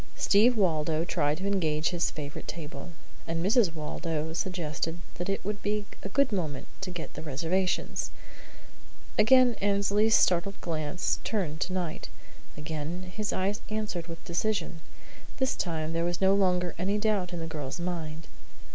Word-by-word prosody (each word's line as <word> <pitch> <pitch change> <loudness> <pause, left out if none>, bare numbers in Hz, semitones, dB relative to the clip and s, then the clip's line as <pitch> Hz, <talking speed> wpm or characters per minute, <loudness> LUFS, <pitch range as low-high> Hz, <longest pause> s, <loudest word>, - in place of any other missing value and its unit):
Steve 225 +4 +5
Waldo 160 -4 +2
tried 150 -4 +1
to 190 - -4
engage 160 -6 +2
his 175 -2 +1
favourite 145 -1 -6
table, 165 +1 -6 0.4
and 165 +1 -1
Mrs. 200 -5 +4
Waldo 160 0 -3
suggested 165 -2 -2 0.2
that 175 - -2
it 195 - -1
would 205 0 -2
be 210 0 0 0.2
a 195 - -5
good 280 +4 +3
moment 160 -8 -2 0.2
to 190 - -3
get 175 -3 -6
the - - -7
reservations. 165 +5 0 1.1
Again 250 +3 +7
Annesley's 205 +2 +4
startled 185 +2 +3
glance 160 0 -1
turned 175 -8 -1
to 185 - 0
Knight. 175 -4 -3 0.5
Again 160 +4 -4
his 215 -2 -1
eyes 200 +4 0
answered 210 -6 -2
with 165 -1 -9
decision. 175 -2 -1 0.6
This 265 -1 +1
time 160 -2 -2
there 165 0 +1
was 175 0 -1
no 190 0 +5
longer 180 -3 +2
any 195 +3 +1
doubt 205 -4 +1
in 175 - -4
the 165 - -3
girl's 155 -1 -4
mind. 165 -3 -3
175 Hz, 155 wpm, -29 LUFS, 160-200 Hz, 1.1 s, Again